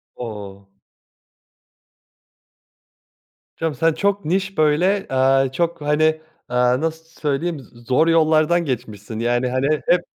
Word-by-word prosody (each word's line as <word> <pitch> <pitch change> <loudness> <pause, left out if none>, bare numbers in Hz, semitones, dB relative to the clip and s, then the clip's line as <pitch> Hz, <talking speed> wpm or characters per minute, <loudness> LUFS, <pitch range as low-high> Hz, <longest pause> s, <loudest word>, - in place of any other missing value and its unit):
O! 100 -4 -8 2.9
Canım 160 -2 -2
sen 165 +5 +2
çok 200 +3 -1
niş 195 +4 -1
böyle, 170 +6 +2
aaa, 135 0 +2
çok 170 +3 -2
hani, 155 +2 +1 0.3
aaa, 125 +1 +2
nasıl 160 0 -3 0.2
söyleyeyim 155 +2 -1
z 120 -2 -17
zor 155 +5 +3
yollardan 165 +1 +3
geçmişsin. 110 -5 -5
Yani 120 +2 0
hani 135 +4 0
hep 175 0 +4
150 Hz, 110 wpm, -21 LUFS, 125-165 Hz, 2.9 s, hep